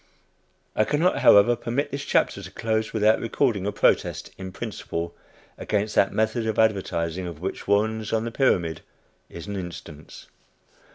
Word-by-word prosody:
I 110 - +3
cannot 150 +8 +1
however 110 +4 +6
permit 120 +5 -2
this 140 +1 -4
chapter 100 - +1
to 95 - -9
close 110 +2 -2
without 110 0 +3
recording 115 -4 0
a - - 0
protest - - +1
in 95 -1 -7
principle 85 -1 -5 0.4
against 105 0 -1
that 95 - +3
method 110 +2 0
of 110 - -2
advertising 95 -5 0
of 85 -3 -8
which 95 +3 -5
Warren's 110 +1 +1
on 110 0 0
the 115 - -4
Pyramid 90 - +1 0.5
is 85 - -9
an 100 -1 -5
instance. 85 -5 -9
105 Hz, 155 wpm, -25 LUFS, 95-110 Hz, 0.5 s, however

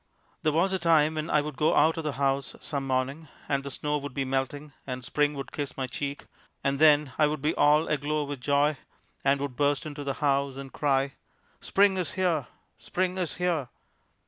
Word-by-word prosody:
There 155 - +2
was 175 +5 +2
a 190 - 0
time 160 -2 +4
when 155 +1 -3
I 150 - +3
would 150 -2 -6
go 155 - +3
out 160 +1 +4
of 165 - -4
the 150 -2 -2
house 135 0 0
some 140 -2 -4
morning, 135 +4 -1 0.2
and 140 -1 0
the 140 - -5
snow 150 +2 -2
would 145 -2 -7
be 135 -1 -1
melting, 135 +2 -2
and 125 -1 -5
Spring 150 +2 +1
would 135 -1 -6
kiss 145 -2 -5
my 135 - -1
cheek, 140 +3 -5 0.4
and 140 -1 0
then 150 -3 +5
I 150 - +6
would 150 0 -2
be 155 +2 +2
all 150 +2 +4
aglow 150 +1 0
with 140 -2 -6
joy 145 +2 +2 0.5
and 140 0 +3
would 140 -2 -4
burst 145 +1 +1
into 145 -1 -6
the 140 -1 -2
house, 140 -2 0
and 135 -1 -8
cry: 135 -2 +1 0.5
"Spring 195 -1 +3
is 180 -3 -2
here! 170 -8 0 0.3
Spring 185 0 -1
is 175 -3 -2
here!" 170 -8 -1
145 Hz, 205 wpm, -28 LUFS, 140-155 Hz, 0.5 s, I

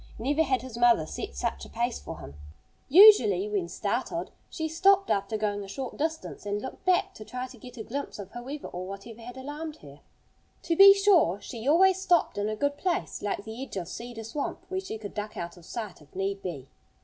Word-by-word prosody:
Never 280 +7 +1
had 260 -6 +1
his 245 -2 -7
mother 235 -9 +5
set 65 - -6
such - - -2
a - - -10
pace 70 - -2
for 70 - -8
him. 70 - -9 0.6
Usually, 260 - +8
when 200 -5 -1
startled, 240 - -2 0.2
she 320 -1 -3
stopped 390 +5 +3
after 200 +2 0
going 205 -1 -1
a - - -9
short 250 +6 -5
distance 320 +1 -3
and 205 0 -2
looked 260 - -8
back 370 -1 +2
to 215 - -10
try 250 +3 -5
to 255 -1 -12
get 250 +2 -12
a 220 - -5
glimpse 280 +6 -5
of 200 -2 -8
whoever 265 +5 -7
or 180 +1 -6
whatever 200 +4 -9
had 245 +2 -9
alarmed 295 +4 -6
her. 140 0 -13 0.6
To 335 - 0
be 395 +2 +10
sure, 375 - +4
she 225 +4 -7
always 375 +5 +5
stopped 350 - +2
in 205 +1 0
a 215 - -2
good 285 +5 -1
place, 360 +2 -2
like 200 -1 -2
the 220 +3 -7
edge 270 - -7
of 175 -3 -3
Cedar 235 +3 -7
Swamp, 280 +6 -4
where 375 - -1
she 380 - -6
could 210 -2 -8
duck 210 0 -5
out 170 0 -5
of 175 -2 -16
sight 215 -6 -6
if 150 - -20
need 195 +1 -2
be. 145 -8 -6
235 Hz, 220 wpm, -28 LUFS, 200-300 Hz, 0.6 s, be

